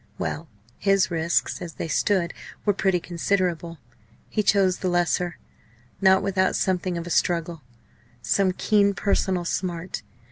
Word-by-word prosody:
Well! 160 +2 -3 0.3
his 195 -2 +2
risks, 170 0 0
as 170 -2 -6
they - - -5
stood, 180 +1 +1 0.3
were 205 - +4
pretty 190 -2 +1
considerable. 170 -1 -1 0.5
He 215 - +1
chose 195 -2 +3
the 185 - -1
lesser 175 0 0 0.6
not 190 0 +5
without 190 -1 +1
something 185 -1 0
of 170 - -4
a 175 - -6
struggle, 170 -2 0 0.6
some 195 +5 +2
keen 200 +1 +2
personal 185 -2 0
smart. 175 0 -3
180 Hz, 135 wpm, -24 LUFS, 170-195 Hz, 0.6 s, not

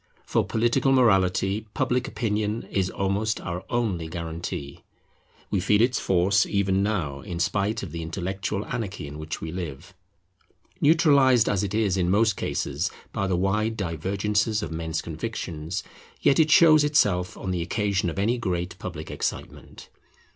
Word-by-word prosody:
For - - +1
political 120 +4 +1
morality 100 -4 +3
Public 125 +1 0
Opinion 110 -1 -1
is 95 -2 0
almost 100 +4 -1
our 90 0 -5
only 105 -9 -1
guarantee. 80 -4 -6 0.7
We 100 - +2
feel 105 +3 +3
its 120 +2 +3
force 95 +2 +3
even 95 -1 +1
now 90 -10 -1
in 90 -4 -6
spite 100 +4 0
of - - -6
the 85 - -5
intellectual 95 +4 -3
anarchy 105 -10 -4
in 75 +1 -8
which 80 +1 -5
we 80 - -5
live. 85 +1 -6 0.9
Neutralized 140 -7 +5
as 100 -1 +1
it 100 +1 -2
is 105 -4 +1
in 90 -1 +1
most 105 +1 +3
cases - - -2 0.2
by 100 - -1
the 90 -2 +1
wide 105 +4 0
divergences 100 +5 -1
of - - -5
men's 80 0 -3
convictions, 80 +5 -4 0.4
yet 140 - +3
it 155 -1 +4
shows 155 -1 +7
itself 105 -12 +2
on 95 - -4
the 90 -2 -1
occasion 100 0 0
of 85 - -6
any 115 +5 +1
great 90 -4 -3
public - - -6
excitement. - - -5
100 Hz, 155 wpm, -25 LUFS, 90-110 Hz, 0.9 s, shows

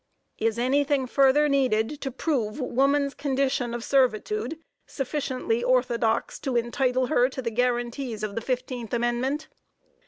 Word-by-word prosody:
Is 225 0 0
anything 275 +2 +2
further 275 +3 +4
needed 270 -1 +1
to 270 - -2
prove 260 -3 -2
woman's 275 +2 +1
condition 265 -3 -1
of 235 - -5
servitude 275 - +1 0.3
sufficiently 260 -4 -2
orthodox 245 -3 +1
to 265 -3 -3
entitle 250 +2 +1
her 250 -2 +3
to 265 - -8
the 235 -3 -2
guaranties 240 -1 -1
of 210 -1 -3
the 230 - -3
fifteenth 245 -1 -3
amendment? 240 +5 -1
255 Hz, 130 wpm, -26 LUFS, 240-275 Hz, 0.3 s, further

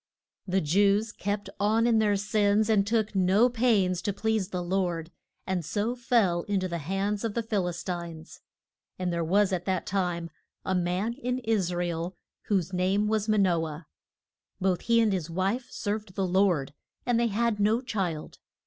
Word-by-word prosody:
THE 190 +1 +1
Jews 200 +7 +2
kept 205 0 -3
on 220 +3 +3
in 230 -2 +4
their 210 -2 +3
sins, 210 +1 +2
and 200 -2 +3
took 220 -1 +1
no 195 +5 +4
pains 215 -7 +2
to 205 - -1
please 215 -1 -1
the 180 -3 -3
Lord, 175 -2 -1 0.3
and 185 -2 -1
so 205 +9 -1
fell 230 -8 +2
in 205 -1 0
to 185 - -1
the 170 -1 -3
hands 195 +6 -2
of 225 -3 -2
the 235 - 0
Phil 205 -5 0
is 175 - -4
tines. 170 -3 -6 0.6
And 180 -1 -2
there 170 0 0
was 195 +4 +2
at 180 -1 -2
that 185 -2 -1
time 180 -4 -2 0.3
a 190 - 0
man 180 +5 0
in 250 -1 -2
Is 210 -6 +1
ra 175 0 -1
el 170 +1 -3 0.3
whose 190 -3 0
name 190 +3 +1
was 215 0 0
Ma 215 - +3
no 175 -5 +3
ah. 155 +2 -8 0.8
Both 185 -2 +1
he 230 0 +3
and 215 -3 +2
his 175 -4 -2
wife 195 +8 -1
served 205 -2 -4
the 195 - 0
Lord; 180 -7 +2 0.3
and 245 -2 +2
they 235 - +3
had 230 0 0
no 215 +3 +3
child. 190 -11 -4
195 Hz, 185 wpm, -28 LUFS, 180-215 Hz, 0.8 s, in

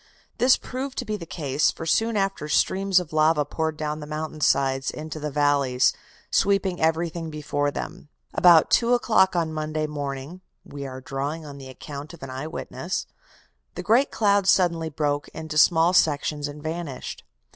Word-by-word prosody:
"This 250 +2 +5
proved 260 +1 -6
to 250 - -2
be 215 -1 -2
the 170 -5 -8
case, 145 -4 0
for 165 - -5
soon 225 +6 +1
after 195 -6 -1
streams 190 +3 +3
of 170 -3 -8
lava 155 -1 +3
poured 160 +1 -2
down 150 0 -3
the 150 - -8
mountain 155 0 -5
sides 135 -2 +2
into 155 0 -6
the 150 0 -3
valleys, 140 -3 +2 0.4
sweeping 195 -2 +1
everything 165 +1 0
before 145 -1 -1
them. 145 - -7 0.2
About 170 -3 +6
two 240 +1 +4
o'clock 205 -6 +3
on 165 -2 0
Monday 155 0 -2
morning 145 +3 -5 0.2
we 140 -1 -7
are 130 0 -8
drawing 140 +5 -4
on 140 -1 -9
the 135 -1 -10
account 145 +4 -8
of 155 - -15
an 135 - -6
eye 130 +4 -5
witness - - -4 0.7
the - - -5
great 245 +6 +3
cloud 200 -2 +2
suddenly 170 -4 +3
broke 145 -1 -1
into 160 -1 -6
small 165 +3 +5
sections 150 -3 +2
and 145 0 -9
vanished. 160 -4 -5
155 Hz, 170 wpm, -24 LUFS, 145-180 Hz, 0.7 s, About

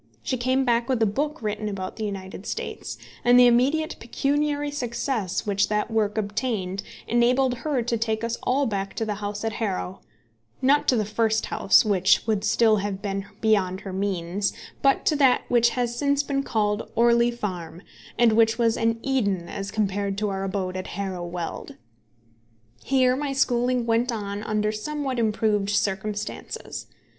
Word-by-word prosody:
She 260 - -1
came 260 +2 +1
back 240 0 +1
with 255 -3 +1
a - - +5
book 290 +6 -2
written 215 0 -2
about 190 -2 -5
the 220 - -2
United 195 0 -6
States, - - -5 0.3
and 245 +1 +6
the 250 - +8
immediate 265 +6 +2
pecuniary 290 +4 -1
success 235 -6 -2
which 200 -1 +1
that 210 +2 0
work 215 -1 0
obtained 205 -3 -2 0.3
enabled 245 +2 +3
her 285 -6 -1
to 235 0 0
take 220 0 -1
us 230 0 -1
all 275 +3 +1
back 195 -4 -3
to 225 - -1
the 215 - -1
house 205 +1 -4
at 225 -1 -1
Harrow, 190 -3 -3 0.6
not 280 +3 +3
to 255 - +4
the 215 -3 +1
first 220 +1 +1
house, 195 - +4
which 195 -2 +3
would 215 -3 0
still 215 0 +4
have 200 -1 -3
been 195 -1 -3
beyond 195 -4 +2
her 195 - -7
means, 195 0 -1 0.3
but 275 -1 +3
to 310 - +3
that 265 -3 +4
which 235 -1 +4
has 240 -1 0
since 280 +2 +1
been 280 -1 -1
called 210 -5 -1
Orley 235 +1 +4
Farm, 185 -7 -5 0.3
and 235 -2 +5
which 225 0 +4
was 230 -2 +2
an 230 0 +1
Eden 200 -10 0
as 195 +3 -5
compared 200 -2 -1
to 210 0 0
our 195 0 -3
abode 190 -1 -2
at 185 - -4
Harrow 185 -3 -3
Weald. 175 -1 -5 1.1
Here 255 -2 +3
my 280 0 -2
schooling 250 -2 +1
went 235 +2 +1
on 205 -2 -4
under 215 0 0
somewhat 265 +3 -3
improved 215 -2 +1
circumstances. 205 0 -3
220 Hz, 170 wpm, -25 LUFS, 200-245 Hz, 1.1 s, the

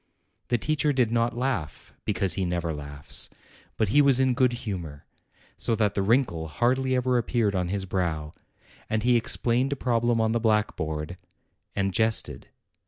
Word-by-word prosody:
The 120 - +2
teacher 150 +4 +1
did 125 -5 +1
not 115 0 +1
laugh, 115 - -3
because 95 -2 +1
he 95 - -1
never 85 -2 -1
laughs; 70 -1 -4 0.5
but 110 -3 +1
he 145 +8 +5
was 135 -3 +5
in 130 -1 +3
good 125 0 +3
humor, 85 -9 -5 0.5
so 115 - +1
that 105 -2 +1
the 100 - 0
wrinkle 100 -7 +1
hardly 130 +8 +1
ever 125 -1 +2
appeared 115 -3 0
on 90 -2 0
his 100 0 -2
brow; 80 -5 -2 0.6
and 110 -1 0
he 125 0 +4
explained 120 +3 +1
a - - -3
problem 120 -2 +1
on 110 0 +2
the 115 - +1
blackboard, 90 -7 -1 0.6
and 100 -1 0
jested. 110 +3 0
110 Hz, 165 wpm, -26 LUFS, 90-125 Hz, 0.6 s, he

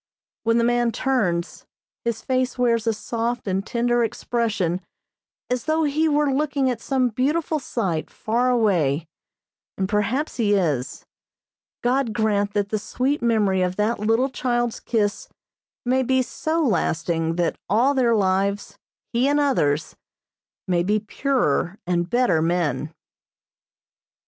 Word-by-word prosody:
When 230 +1 +3
the 235 - +3
man 240 0 +2
turns, 185 -11 -1 0.4
his 235 -1 -2
face 255 -1 0
wears 235 -2 +1
a - - +4
soft 235 +2 -3
and 190 0 0
tender 240 +2 +1
expression 220 -6 -1 0.7
as 250 -1 -2
though 315 +1 +1
he 310 +2 +1
were 295 -2 +2
looking 280 -2 +1
at 235 -2 -5
some 260 -2 +1
beautiful 300 +7 0
sight 190 - -2
far 240 +3 0
away, 175 - +2 0.7
and, 190 - 0
perhaps, 210 +10 -1
he 210 -4 +2
is. 150 -10 -1 0.8
God 245 -1 +1
grant 205 -2 0
that 205 -1 0
the 215 - -1
sweet 265 +7 -1
memory 210 -5 +2
of 180 0 0
that 210 +3 0
little 225 +5 +2
child's 240 -2 -1
kiss 210 -3 -1 0.6
may 260 +2 +2
be 260 0 +2
so 320 +6 -1
lasting 165 - 0
that 170 -1 -1
all 240 +8 +3
their 245 -4 +3
lives, 200 0 0 0.3
he 240 +3 +2
and 290 +1 +2
others, 160 - +1 0.7
may 175 -2 +2
be 210 +4 +1
purer 210 - 0
and 175 0 0
better 240 -10 +2
men. 160 -4 0
230 Hz, 135 wpm, -23 LUFS, 190-255 Hz, 0.8 s, a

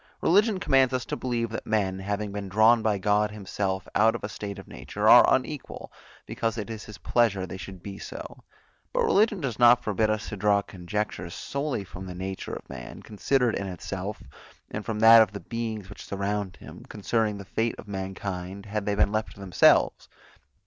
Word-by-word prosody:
Religion 205 +3 +3
commands 135 -5 +3
us 125 - -2
to - - -3
believe, 120 -3 -2
that 110 - -4
men, 95 -4 0
having 100 +1 -3
been 100 -1 -5
drawn 110 +4 +5
by 110 -2 +1
God 105 +2 +2
himself 95 -2 -3
out 110 +2 +4
of 115 - -6
a 105 - -3
state 100 -1 -6
of 95 - -10
nature, - - -3
are - - +8
unequal, - - -2 0.3
because 115 0 -2
it 105 0 -4
is 110 -2 -7
his 105 -2 -10
pleasure 105 -6 +1
they 95 - -7
should 95 -1 -9
be 100 -1 -7
so; - - -9 0.5
but - - +2
religion 210 0 +3
does 125 -8 -3
not 120 0 +6
forbid 110 +1 +1
us 110 0 -1
to 105 - -5
draw 100 0 +3
conjectures 90 -1 -4
solely 140 -6 -3
from 90 +1 -9
the 90 - -7
nature 95 +1 -5
of - - -10
man, 60 -2 -9
considered 120 +3 +1
in 100 - -3
itself, 90 -3 -5 0.5
and 105 - -4
from 110 -1 -3
that 115 0 +9
of 110 - +2
the 100 - -5
beings 110 -4 -5
which - - -10
surround 100 -1 -3
him, - - -12
concerning 105 0 -1
the 100 - -9
fate 115 +4 -1
of - - -11
mankind, 95 0 -5
had 105 0 -4
they 105 - +1
been 100 0 +2
left 110 0 -2
to - - -16
themselves. 95 -4 +3
105 Hz, 195 wpm, -26 LUFS, 95-115 Hz, 0.5 s, that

